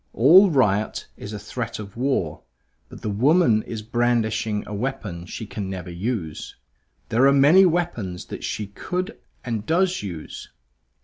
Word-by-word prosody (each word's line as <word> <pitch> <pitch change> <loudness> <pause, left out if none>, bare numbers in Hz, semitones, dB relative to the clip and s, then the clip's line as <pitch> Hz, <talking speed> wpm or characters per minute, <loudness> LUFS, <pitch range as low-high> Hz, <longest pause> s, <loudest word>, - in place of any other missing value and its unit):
All 180 - +7
riot 110 - +1
is 100 - -8
a 105 - -5
threat 115 +3 -5
of 100 -2 -9
war; 120 - -1 0.5
but - - -12
the - - -2
woman 125 - +4
is 110 -1 -7
brandishing 110 -2 0
a 105 - -7
weapon 105 -7 -4
she 110 - -6
can 100 -2 -5
never 90 -2 -6
use. 85 -4 -4 0.5
There 125 +4 +4
are - - +6
many 150 +8 +6
weapons 140 - -2
that - - -8
she 105 - -3
could 180 - -5 0.3
and 115 -4 -2
does 180 - +1
use. 85 -6 -7
115 Hz, 150 wpm, -23 LUFS, 100-140 Hz, 0.5 s, All